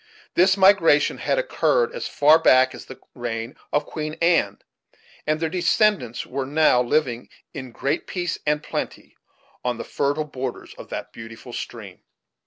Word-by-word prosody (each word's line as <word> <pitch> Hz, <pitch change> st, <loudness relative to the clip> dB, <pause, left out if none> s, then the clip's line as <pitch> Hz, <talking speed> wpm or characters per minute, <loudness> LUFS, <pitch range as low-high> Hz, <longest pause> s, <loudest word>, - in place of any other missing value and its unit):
This 190 Hz, +2 st, +4 dB
migration 190 Hz, -6 st, +4 dB
had -, -, 0 dB
occurred -, -, +1 dB
as 485 Hz, -, -4 dB
far 150 Hz, +3 st, +5 dB
back 130 Hz, -4 st, +5 dB
as -, -, -10 dB
the 130 Hz, -, -11 dB
reign 120 Hz, +1 st, -5 dB, 0.2 s
of 145 Hz, -, +1 dB
Queen 155 Hz, -1 st, -5 dB
Anne; 170 Hz, 0 st, +2 dB, 0.7 s
and 155 Hz, 0 st, +1 dB
their 165 Hz, -, 0 dB
descendants 180 Hz, -, +1 dB
were 130 Hz, 0 st, -4 dB
now 145 Hz, -3 st, +4 dB
living, 125 Hz, -2 st, -1 dB, 0.2 s
in 130 Hz, -3 st, -7 dB
great 140 Hz, +7 st, -2 dB
peace 175 Hz, -2 st, -3 dB
and 150 Hz, 0 st, +1 dB
plenty, -, -, -5 dB, 0.5 s
on 125 Hz, -1 st, -1 dB
the -, -, -5 dB
fertile 145 Hz, +2 st, -1 dB
borders 130 Hz, -3 st, -6 dB
of -, -, -12 dB
that -, -, -6 dB
beautiful 115 Hz, 0 st, -10 dB
stream. -, -, -8 dB
150 Hz, 155 wpm, -23 LUFS, 130-170 Hz, 0.7 s, far